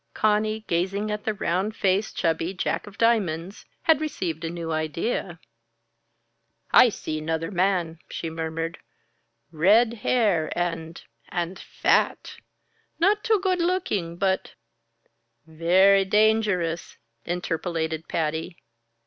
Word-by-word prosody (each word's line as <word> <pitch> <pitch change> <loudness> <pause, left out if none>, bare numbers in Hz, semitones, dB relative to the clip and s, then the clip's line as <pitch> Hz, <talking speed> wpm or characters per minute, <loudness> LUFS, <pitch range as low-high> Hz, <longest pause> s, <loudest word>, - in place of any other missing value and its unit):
Conny, 215 +1 +1
gazing 195 +3 -1
at 210 0 -4
the 220 - 0
round 195 +3 -1
faced, 195 +1 0
chubby 165 +2 0
Jack 185 - -2
of 200 - -12
Diamonds, 195 -6 0 0.2
had 315 -2 +4
received 175 - -3
a 165 - -2
new 165 -1 -5
idea. 155 +7 -2 1.3
"I 250 - +8
see 155 -7 -5
'nother 160 +2 -2
man," 180 -3 0
she 165 - -5
murmured. 165 +1 -4 0.7
"Red 210 +9 +4
hair 200 -11 +2
and 165 -2 -3 0.3
and 175 +1 -3
fat. - - 0 0.6
Not 410 +6 +3
too 445 -4 +3
good 370 -2 +1
looking 335 - -1
but 190 0 -1 0.5
" 115 0 -46
"Very 185 +5 +4
dangerous!" 205 -5 +1 0.3
interpolated 165 -2 -3
Patty. 160 +2 -2
180 Hz, 115 wpm, -25 LUFS, 165-215 Hz, 1.3 s, I